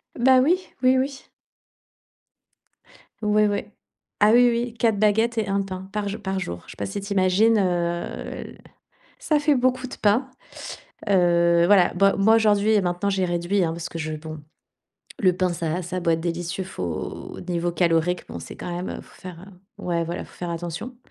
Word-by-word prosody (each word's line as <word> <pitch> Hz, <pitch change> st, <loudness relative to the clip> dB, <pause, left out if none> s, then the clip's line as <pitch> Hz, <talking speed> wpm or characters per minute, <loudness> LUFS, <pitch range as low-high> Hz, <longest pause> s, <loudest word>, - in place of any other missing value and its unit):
Ben 255 Hz, +1 st, +5 dB
oui. 340 Hz, +7 st, +4 dB, 0.2 s
Oui, 255 Hz, 0 st, +4 dB
oui. 270 Hz, +1 st, -3 dB, 1.9 s
Oui, 210 Hz, 0 st, +3 dB
oui. 205 Hz, 0 st, -1 dB, 0.5 s
Ah 210 Hz, 0 st, +5 dB
oui, 245 Hz, 0 st, +6 dB
oui, 235 Hz, 0 st, -1 dB
4 230 Hz, -2 st, +1 dB
baguettes 220 Hz, +3 st, +2 dB
et 220 Hz, -2 st, 0 dB
1 200 Hz, 0 st, +1 dB
pain 190 Hz, -1 st, -7 dB
par 210 Hz, -1 st, -2 dB
jou 210 Hz, +2 st, -5 dB
par 190 Hz, -2 st, -3 dB
jour. 85 Hz, -, -5 dB
Je -, -, -9 dB
sais -, -, -12 dB
pas 100 Hz, -, -3 dB
si 100 Hz, -, -5 dB
tu 200 Hz, +1 st, -4 dB
imagines, 200 Hz, +4 st, +4 dB
heu, -, -, +3 dB, 0.8 s
l -, -, -11 dB, 0.6 s
ça 315 Hz, -12 st, +1 dB
fait 295 Hz, 0 st, +3 dB
beaucoup 255 Hz, 0 st, +1 dB
de 255 Hz, -, -9 dB
pain. 220 Hz, +6 st, +2 dB, 0.8 s
Heu, 170 Hz, -3 st, +4 dB
voilà. 190 Hz, -2 st, +5 dB
Bah 195 Hz, +2 st, +4 dB
moi 220 Hz, +3 st, +5 dB
aujourd'hui 210 Hz, -1 st, +3 dB
et 210 Hz, -, +4 dB
maintenant 175 Hz, +2 st, -1 dB
j'ai 190 Hz, -1 st, 0 dB
réduit, 175 Hz, +2 st, 0 dB
hein, 165 Hz, -, -1 dB
parce 165 Hz, 0 st, -5 dB
que 165 Hz, -, -7 dB
je 155 Hz, -1 st, -3 dB
bon, 155 Hz, 0 st, -8 dB, 0.8 s
le 185 Hz, -3 st, +3 dB
pain, 185 Hz, 0 st, +1 dB
ça 170 Hz, -1 st, -3 dB
va 175 Hz, +3 st, -2 dB
ça 180 Hz, +2 st, -5 dB
a -, -, -1 dB
beau 170 Hz, -, +1 dB
être 165 Hz, 0 st, +1 dB
délicieux, 175 Hz, +2 st, -3 dB
faut 90 Hz, -, -6 dB
niveau 175 Hz, 0 st, 0 dB
calorique, 170 Hz, 0 st, +1 dB
bon, -, -, -7 dB
c'est -, -, -9 dB
quand 175 Hz, -, -5 dB
même, 180 Hz, +2 st, -4 dB
il -, -, -9 dB
faut -, -, -19 dB
faire 180 Hz, 0 st, -10 dB, 0.3 s
ouais 175 Hz, -4 st, -1 dB
voilà, 170 Hz, +2 st, -4 dB
il -, -, -11 dB
faut -, -, -19 dB
faire 175 Hz, -1 st, -5 dB
attention. 170 Hz, +8 st, -5 dB
190 Hz, 200 wpm, -24 LUFS, 175-220 Hz, 1.9 s, oui